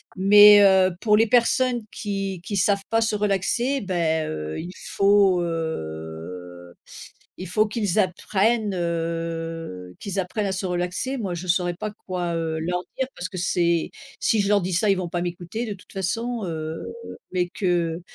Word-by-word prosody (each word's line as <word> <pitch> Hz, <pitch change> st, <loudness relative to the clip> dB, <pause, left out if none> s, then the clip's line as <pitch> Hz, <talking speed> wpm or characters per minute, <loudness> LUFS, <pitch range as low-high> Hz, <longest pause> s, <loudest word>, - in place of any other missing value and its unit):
mais, 205 Hz, +2 st, +8 dB
heu, 190 Hz, -1 st, +6 dB
pour 210 Hz, -2 st, +4 dB
les 225 Hz, +2 st, +4 dB
personnes 245 Hz, +1 st, +2 dB
qui 195 Hz, -3 st, -4 dB
qui 200 Hz, +2 st, -3 dB
savent 200 Hz, +1 st, +2 dB
pas 225 Hz, 0 st, +2 dB
se 220 Hz, -1 st, +1 dB
relaxer, 210 Hz, +7 st, 0 dB
bah, 170 Hz, -5 st, 0 dB
heu, 75 Hz, -, -4 dB
il 175 Hz, +2 st, -6 dB, 0.2 s
faut, 195 Hz, -2 st, +4 dB
heu, 90 Hz, -, -6 dB, 0.7 s
il 185 Hz, -, -6 dB
faut 215 Hz, +5 st, +2 dB
qu'ils 210 Hz, -3 st, -1 dB
apprennent, 205 Hz, +3 st, +1 dB
heu, 165 Hz, -, -4 dB
qu'ils 200 Hz, -1 st, -4 dB
apprennent 200 Hz, +3 st, -2 dB
à 195 Hz, -, -1 dB
se 190 Hz, +1 st, -3 dB
relaxer. 180 Hz, +9 st, -2 dB
Moi 195 Hz, -6 st, -3 dB
je 175 Hz, +2 st, -6 dB
saurais 175 Hz, 0 st, +1 dB
pas 215 Hz, +5 st, -4 dB, 0.2 s
quoi, 180 Hz, -2 st, -2 dB
heu, 160 Hz, -1 st, -2 dB
leur 180 Hz, +2 st, -1 dB, 0.2 s
dire 265 Hz, -, +1 dB
parce 175 Hz, -, -5 dB
que 185 Hz, -, -9 dB
c'est 170 Hz, -2 st, +1 dB, 0.3 s
si 220 Hz, -, +2 dB
je 200 Hz, -, 0 dB
leur 205 Hz, -1 st, +4 dB
dis 185 Hz, +1 st, -3 dB
ça, 175 Hz, +5 st, +2 dB
ils -, -, +5 dB
vont 185 Hz, -1 st, -3 dB
pas 175 Hz, -, -2 dB
m'écouter 180 Hz, +6 st, -4 dB
de 210 Hz, -, -4 dB
toute 185 Hz, -, -17 dB
façon, 225 Hz, +5 st, -2 dB
heu, 160 Hz, -1 st, -4 dB, 0.5 s
mais 180 Hz, -1 st, 0 dB
que 175 Hz, -3 st, -1 dB
185 Hz, 170 wpm, -24 LUFS, 165-205 Hz, 0.7 s, mais